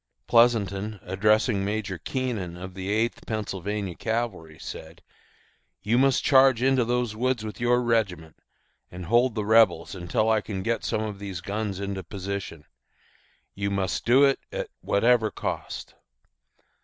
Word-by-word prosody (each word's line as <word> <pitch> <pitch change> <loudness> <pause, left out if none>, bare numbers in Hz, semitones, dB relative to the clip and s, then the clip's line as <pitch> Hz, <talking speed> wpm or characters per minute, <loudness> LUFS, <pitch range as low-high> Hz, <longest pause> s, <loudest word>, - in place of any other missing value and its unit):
Pleasonton, 105 - +2
addressing 105 +2 +2
Major 100 -3 -3
Keenan 110 - -3
of 95 +1 -8
the 95 +1 -5
Eighth 110 +3 -1
Pennsylvania 100 -2 -3
Cavalry, 105 -7 -3
said, 80 +3 -9 0.8
"You 115 +4 +2
must 135 -1 +3
charge 130 -3 +5
into 130 -1 +3
those 120 -2 -1
woods 125 -1 -1
with 110 - -7
your 120 +1 +2
regiment, 95 -9 -1 0.5
and 90 0 -8
hold 120 +5 +3
the 105 -2 -2
Rebels 105 -7 +4
until 95 +4 -1
I 110 -1 +3
can 95 -3 -5
get 115 +2 -1
some 110 - -1
of 105 -2 -5
these 100 -3 -5
guns 100 0 -3
into 100 -1 -3
position. 95 -3 -6 0.9
You 100 0 -2
must 95 -2 -1
do 130 +4 +5
it 135 -1 +4
at - - -4
whatever 110 +1 +3
cost." - - -5
105 Hz, 145 wpm, -26 LUFS, 95-120 Hz, 0.9 s, charge